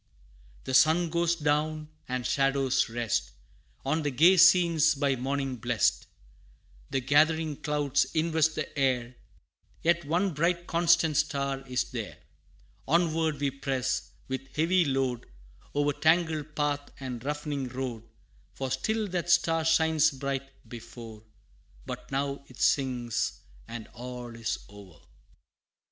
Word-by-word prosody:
The 130 - -5
sun 160 +4 +4
goes 170 0 +1
down, 155 0 -1 0.2
and 125 -1 -2
shadows 135 -2 +1
rest 115 -2 -1 0.6
On 155 +4 +1
the 145 - -1
gay 160 +8 +5
scenes 170 -3 +5
by 140 -1 +1
morning 135 0 -2
blest; 120 -2 0 0.8
The 135 - -1
gathering 155 +3 +2
clouds 145 -3 +1
invest 160 -1 +2
the 155 - -5
air 125 -3 0 0.7
Yet 170 +1 +2
one 175 +5 0
bright 170 +3 0
constant 170 -3 +3
Star 140 -2 -1
is 125 0 0
there. 115 -6 -5 0.7
Onward 160 -1 +1
we 140 -1 0
press, 135 -1 -2 0.2
with 130 0 -6
heavy 175 +3 +3
load, 130 -3 -1 0.5
O'er 145 0 +2
tangled 160 -2 +1
path 145 -1 -1
and 125 -3 -6
rough'ning 145 -1 -3
road, 125 -2 -5 0.5
For 135 -1 -4
still 215 +11 -1
that 175 -1 -3
Star 165 -1 +3
shines 160 -1 +3
bright 135 -1 -5
before; 115 -2 -10 0.6
But - - -7
now 140 +1 -2
it 130 - -15
sinks, 125 -4 0 0.3
and 115 -2 -7
all 125 0 -8
is 115 -1 -2
o'er! 100 -6 -14
140 Hz, 125 wpm, -28 LUFS, 130-160 Hz, 0.8 s, gay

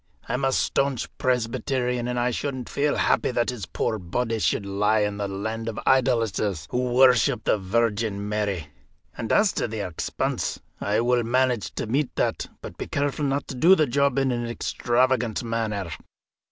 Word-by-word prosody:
I - - -3
am 125 +2 -1
a 135 - +2
staunch 135 -1 0
Presbyterian, 125 0 0
and 125 0 -1
I 125 +1 +1
shouldn't 130 0 -3
feel 145 +1 +1
happy - - +2
that 120 -1 0
his 110 -7 -6
poor 110 - -1
body 115 +6 -2
should 100 - +1
lie 105 +2 +2
in 105 -1 -1
the 100 -1 -2
land 110 +4 -3
of 110 - -5
idolaters, 115 -9 +1
who 125 0 0
worship 125 -4 +5
the 105 - +2
Virgin 105 0 0
Mary. 100 -7 -2 0.5
And 110 - -4
as 210 -1 +4
to - - -1
the 110 -1 -4
expense, 85 -3 -2 0.2
I 105 +2 +1
will 120 0 +2
manage 125 -1 0
to - - -2
meet 130 +4 -1
that; - - 0
but - - -9
be - - -4
careful 145 +1 -1
not 140 +1 -1
to - - -4
do 170 +9 +6
the 155 - +3
job 140 0 +1
in 135 -1 +2
an 120 -1 -2
extravagant 120 0 0
manner.'" 110 -6 -2
120 Hz, 180 wpm, -25 LUFS, 105-130 Hz, 0.5 s, do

